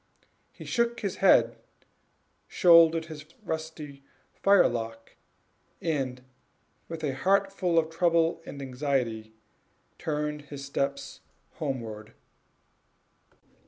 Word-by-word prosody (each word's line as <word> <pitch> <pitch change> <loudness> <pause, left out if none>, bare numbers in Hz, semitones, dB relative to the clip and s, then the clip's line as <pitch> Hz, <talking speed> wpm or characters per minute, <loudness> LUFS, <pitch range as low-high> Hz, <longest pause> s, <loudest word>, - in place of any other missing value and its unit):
He - - -12
shook 235 -1 0
his 200 -3 -3
head, 120 -12 +4 0.9
shouldered 165 -2 +6
the 155 -2 -9 0.2
rusty 160 -5 -6 0.3
firelock, 115 - +1 0.6
and, 130 -6 -2 0.6
with 165 -1 -7
a 140 -3 0
heart 195 +7 +2
full 180 -4 0
of 160 0 +2
trouble 165 -1 +2
and 140 -3 -8
anxiety, 125 -5 -2 0.6
turned 150 -1 -2
his 140 -1 -7
steps 140 0 -3 0.4
homeward. 115 -6 -5
150 Hz, 90 wpm, -28 LUFS, 130-165 Hz, 0.9 s, shouldered